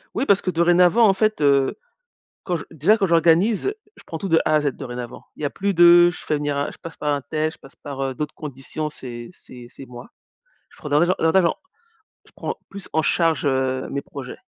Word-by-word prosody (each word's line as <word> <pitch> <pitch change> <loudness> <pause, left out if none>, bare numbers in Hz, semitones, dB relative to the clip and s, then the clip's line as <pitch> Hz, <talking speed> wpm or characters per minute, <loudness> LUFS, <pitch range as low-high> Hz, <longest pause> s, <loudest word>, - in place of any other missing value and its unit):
Oui - - 0
parce 200 -5 +3
que 185 - -2
dorénavant, 175 +6 +4
en 195 - +4
fait, 215 +2 0
heu, 140 -2 +2 0.7
quand 180 - -1
j 160 - -4
déjà, 165 +8 +3
quand 200 - +1
j'organise, 175 - +3 0.2
je - - -16
prends 165 - -5
tout 195 +4 -5
de 165 -1 +4
A 155 - +3
à 155 - +3
Z, 145 - -1
dorénavant. 125 -2 -8
Il - - -13
y - - -1
a - - 0
plus 200 +5 -2
de 175 0 +7
je 175 - -8
fais 155 - -1
venir 145 -1 -2
un 140 - -2
je - - -14
passe 165 -1 -9
par 150 -1 -1
untel, 155 +3 -2
je - - -15
passe 135 - -16
par, 140 -2 -7
heu, 135 -1 -2
d'autres 150 +3 -4
conditions, 150 +1 -6
c'est 120 -5 -9
c'est 125 -7 -13
c'est 135 +2 -12
moi. 120 0 -11 0.6
Je - - -22
prends 150 - -8
davantage 170 +5 +3
davantage 170 +3 +3
en 170 - +1 0.7
je - - -21
prends - - -4
plus 200 -1 -9
en 160 - +1
charge, 165 -2 +1
heu, 130 -1 0
mes 140 - -3
projets. 135 -3 -9
155 Hz, 230 wpm, -22 LUFS, 140-175 Hz, 0.7 s, de